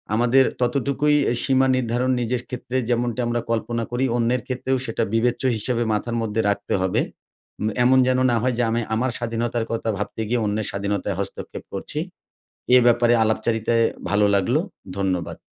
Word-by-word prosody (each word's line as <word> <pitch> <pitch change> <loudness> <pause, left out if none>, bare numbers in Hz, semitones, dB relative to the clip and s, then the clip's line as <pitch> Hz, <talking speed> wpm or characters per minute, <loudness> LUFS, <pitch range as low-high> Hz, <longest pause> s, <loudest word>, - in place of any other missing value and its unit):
আমাদের 120 +3 +4 0.2
ততটুকুই 140 +4 +1
অ্যা 120 - +1
সীমা 135 -1 +3
নির্ধারণ 125 +1 0
নিজের 120 +1 -1
ক্ষেত্রে 125 0 -4
যেমনটি 120 0 0
আমরা 120 0 0
কল্পনা 115 0 -1
করি 125 +2 0
অন্যের 120 +1 +1
ক্ষেত্রেও 130 +1 -1
সেটা 115 - -1
বিবেচ্য 120 +3 +1
হিসাবে 120 +2 -1
মাথার 115 +3 -2
মধ্যে 115 0 -1
রাখতে 100 - -2
হবে। 95 0 +1 0.6
উম 105 - -1 0.2
এমন 130 +2 +5
যেন 130 0 +2
না 120 - +2
হয় 125 0 0
যে 120 - +2
আমি 115 +1 0
আমার 125 +2 0
স্বাধীনতার 115 -1 -2
কথা 115 0 -2
ভাবতে 105 +2 -4
গিয়ে 120 0 0
অন্যের 105 0 -1
স্বাধীনতায় 100 0 -2
হস্তক্ষেপ 100 -1 -5
করছি। 125 +9 -4 0.8
এ - - +9
ব্যাপারে 120 0 +4
আলাপচারিতায় 115 +1 +1 0.2
ভালো 105 0 +3
লাগলো, 115 +9 +2 0.4
ধন্যবাদ। 90 -4 -2
120 Hz, 160 wpm, -23 LUFS, 110-125 Hz, 0.8 s, এ